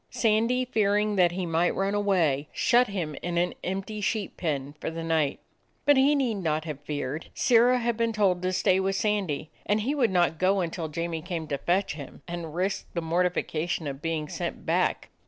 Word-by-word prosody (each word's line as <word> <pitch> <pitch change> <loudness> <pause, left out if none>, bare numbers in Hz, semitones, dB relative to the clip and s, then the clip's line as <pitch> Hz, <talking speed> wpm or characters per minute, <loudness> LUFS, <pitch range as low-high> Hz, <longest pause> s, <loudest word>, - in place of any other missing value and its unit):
Sandy, 230 +3 +2
fearing 210 -2 +1
that 175 -2 +4
he 185 0 -2
might 170 +1 +1
run 195 +1 0
away, 175 -9 +1
shut 245 0 +3
him 175 -7 -3
in 175 0 -2
an 175 +1 +1
empty 195 +3 -3
sheep 205 0 -1
pen 145 -4 -2
for - - -2
the 165 0 -5
night. 160 -3 +1 0.5
But 290 - +6
he 275 +2 +4
need 240 -8 0
not 155 -2 -1
have 150 -4 -5
feared. 145 0 -4
Sirrah 245 +1 +4
had 235 -2 -1
been 230 -1 +1
told 195 -5 +2
to 185 0 0
stay 185 0 +3
with 190 0 0
Sandy, 190 -8 -1
and 210 +1 +1
he 260 +7 0
would 265 -6 +2
not 175 -3 +2
go 190 +1 +3
until 165 -1 -3
Jamie 165 +1 -3
came 170 -2 -4
to 140 - -1
fetch 185 +3 +1
him, 145 -3 -10
and 170 -2 -6
risk 190 +3 -1
the 170 - 0
mortification 170 -1 0
of 140 -1 -5
being 165 -2 -2
sent - - -5
back. - - 0
180 Hz, 195 wpm, -27 LUFS, 160-210 Hz, 0.5 s, But